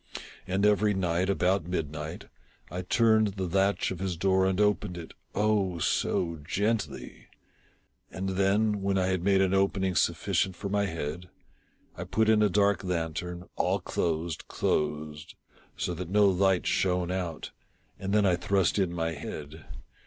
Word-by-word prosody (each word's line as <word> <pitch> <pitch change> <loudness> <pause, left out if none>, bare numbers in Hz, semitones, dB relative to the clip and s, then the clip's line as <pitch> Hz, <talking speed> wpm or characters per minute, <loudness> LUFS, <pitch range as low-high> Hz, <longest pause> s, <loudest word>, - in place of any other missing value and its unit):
And 95 +2 +1
every 105 0 +3
night, 90 0 0
about 95 -2 +1
midnight, 75 -3 -4 0.5
I 90 - -3
turned 110 +1 +3
the 95 - -3
latch 95 +2 +1
of 95 - -5
his 95 -3 -2
door 95 +1 +2
and 95 0 0
opened 105 -4 +1
it 85 -2 -9 0.2
— - - -30
oh, 105 -4 +1
so 85 0 0
gently! 100 -4 -2 0.8
And 95 +2 -4
then, 100 +2 +1
when 100 0 0
I 95 - +2
had 95 -1 0
made 95 0 +4
an 95 0 +2
opening 95 -1 +1
sufficient 95 +1 +1
for 100 - -5
my 100 0 +1
head, 80 +1 -5 0.7
I - - -6
put 110 0 +1
in 110 -1 +5
a 105 - +4
dark 100 -1 +2
lantern, 90 0 -3
all - - +1
closed, 80 -1 -2
closed, 75 0 -2 0.4
so 90 - -2
that 85 0 -6
no 105 +2 +4
light 95 -1 +3
shone 90 -1 +1
out, 90 -4 -4 0.5
and 95 0 -3
then 105 0 +3
I 90 -2 +3
thrust 95 +1 +1
in 95 -3 +1
my 80 -1 -2
head. 75 0 -8
95 Hz, 160 wpm, -28 LUFS, 85-100 Hz, 0.8 s, in